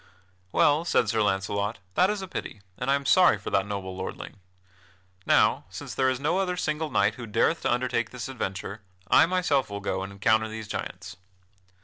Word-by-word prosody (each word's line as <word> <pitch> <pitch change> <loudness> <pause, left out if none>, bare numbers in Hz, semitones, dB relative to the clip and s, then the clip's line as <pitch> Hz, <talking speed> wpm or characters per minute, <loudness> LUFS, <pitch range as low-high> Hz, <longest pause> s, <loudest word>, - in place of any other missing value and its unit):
"Well," 150 +3 +3
said 125 -9 +2
Sir 110 0 +1
Launcelot, 100 +1 0 0.2
"that 185 - +4
is 210 -2 -2
a - - -6
pity 105 - -6
and 125 +5 -4
I 140 - +5
am 140 0 -3
sorry 180 -6 +5
for 100 - -7
that 100 0 +1
noble 95 -2 -5
lordling. 95 +1 -7 0.9
Now, - - +3
since - - -7
there 130 -1 +2
is 130 -1 -1
no 150 +7 +1
other 180 -2 -1
single 155 -2 -1
knight - - +2
who 115 - -6
dareth 115 +10 +1
to - - 0
undertake 120 -2 0
this 125 -1 -6
adventure, 105 -4 -5 0.3
I - - +7
myself 170 -8 +1
will 100 0 -5
go 95 -1 -2
and 95 0 -6
encounter 110 +3 +2
these 110 -1 -7
giants." - - -6
115 Hz, 195 wpm, -26 LUFS, 100-150 Hz, 0.9 s, I